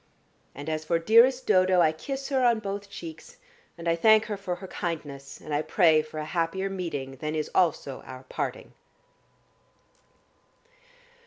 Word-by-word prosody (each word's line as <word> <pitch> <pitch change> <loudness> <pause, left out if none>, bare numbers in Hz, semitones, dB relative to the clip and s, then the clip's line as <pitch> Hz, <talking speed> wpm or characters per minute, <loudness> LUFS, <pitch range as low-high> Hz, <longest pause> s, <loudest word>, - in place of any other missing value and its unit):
And 145 +2 -8
as 155 0 -2
for 165 +2 +1
dearest 235 +9 +5
Dodo, 185 0 +4
I 160 -2 +5
kiss 270 - -5
her 265 -2 +1
on 240 -2 +4
both 200 -1 -5
cheeks, 160 -4 -10 0.4
and 170 0 -6
I 165 - +3
thank 220 +5 +5
her 210 - -3
for 185 -3 -4
her 190 - -9
kindness, 145 -7 -5
and 155 - -7
I 145 - +2
pray 160 -2 +4
for 155 0 -10
a 155 - -3
happier 175 +4 -1
meeting 145 -8 -4
than 155 +3 -3
is 155 -1 -3
also 160 -6 +1
our 130 0 -10
parting." 130 - -5
170 Hz, 160 wpm, -27 LUFS, 155-200 Hz, 0.4 s, dearest